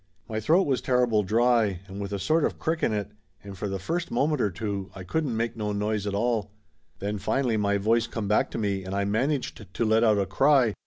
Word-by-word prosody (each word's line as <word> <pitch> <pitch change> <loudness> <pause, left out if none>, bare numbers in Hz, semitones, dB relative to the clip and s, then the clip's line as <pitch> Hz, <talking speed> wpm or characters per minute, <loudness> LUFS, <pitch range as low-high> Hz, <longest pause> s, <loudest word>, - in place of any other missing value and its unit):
My 110 -1 -3
throat 165 - +4
was 135 -3 0
terrible 125 -4 +2
dry 110 -2 +2
and 95 +1 -7
with 100 0 -5
a 100 - -1
sort 155 - +1
of - - 0
crick 160 +1 -1
in - - +2
it, 105 -1 -2 0.3
and 100 -1 -8
for 100 +2 -4
the 95 - -2
first 170 - -3
moment 145 +3 +1
or 105 - +2
two 100 +1 -4
I 95 - -7
couldn't 130 - -1
make 115 0 -1
no 105 -2 -2
noise 105 0 -1
at 100 - -2
all. 110 -1 0 0.5
Then 100 +1 -3
finally 120 +4 0
my 100 -1 +1
voice 115 +3 +2
come 110 -3 -4
back 105 - +2
to - - -5
me 100 -3 -1
and 95 +1 -5
I 100 0 0
managed 125 +4 -1
to 115 - -1
let 110 +1 +3
out 110 -2 +4
a 100 - +1
cry. 125 +4 +3
110 Hz, 235 wpm, -26 LUFS, 100-120 Hz, 0.5 s, throat